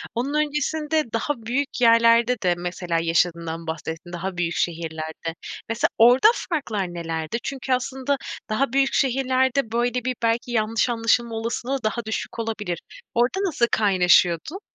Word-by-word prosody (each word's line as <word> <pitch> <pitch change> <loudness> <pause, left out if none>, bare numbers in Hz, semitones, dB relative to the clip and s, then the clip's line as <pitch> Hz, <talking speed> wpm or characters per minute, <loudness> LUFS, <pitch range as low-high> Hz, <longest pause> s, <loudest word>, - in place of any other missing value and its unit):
onun 255 +5 -1
öncesinde 300 +1 0
daha 230 +6 0
büyük 260 +3 -2
yerlerde 230 +1 +5
de 180 -1 +3
mesela 175 -1 -2
yaşadığından 165 0 0
bahsettin, 160 +2 -6
daha 180 +1 -4
büyük 175 -1 -1
şehirlerde. 160 -1 -3 0.3
Mesela 225 +1 +1
orada 245 - +7 0.2
farklar 210 - -2
nelerdi? 165 +3 -3
Çünkü 265 -1 -2
aslında 265 +2 -1 0.3
daha 235 +4 0
büyük 270 0 +2
şehirlerde 260 -1 +1
böyle, 245 +1 0
bir, 255 - -1
belki 230 +1 0
yanlış 225 +1 +1
anlaşılma 230 0 +1
olasılığı 235 +4 -3
daha 215 +1 -2
düşük 220 +1 -4
olabilir. 210 -6 -3 0.4
Orada 245 +10 +2
nasıl 305 -10 +2
kaynaşıyordun? 185 - +3
230 Hz, 135 wpm, -23 LUFS, 175-260 Hz, 0.4 s, orada